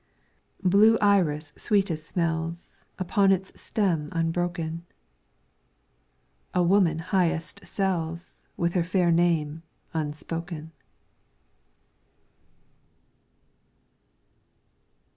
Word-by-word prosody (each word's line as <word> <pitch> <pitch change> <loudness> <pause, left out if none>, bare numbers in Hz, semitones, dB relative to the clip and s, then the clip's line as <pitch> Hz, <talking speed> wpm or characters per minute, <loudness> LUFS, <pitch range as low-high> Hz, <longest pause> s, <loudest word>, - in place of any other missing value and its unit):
' - - -35
Blue 205 +5 +6
iris 160 -7 +2
sweetest 180 -7 0
smells, 165 0 -3
Upon 195 +1 +2
its 190 0 0
stem 170 -8 0
unbroken. 165 0 -2 1.7
A 180 - +4
woman 175 -3 +3
highest 170 -1 -1
sells, 170 -4 -3 0.2
With 170 0 0
her 180 - +2
fair 180 0 +2
name 165 -2 +1 0.3
unspoken. 160 +1 -4
170 Hz, 70 wpm, -26 LUFS, 165-190 Hz, 1.7 s, Blue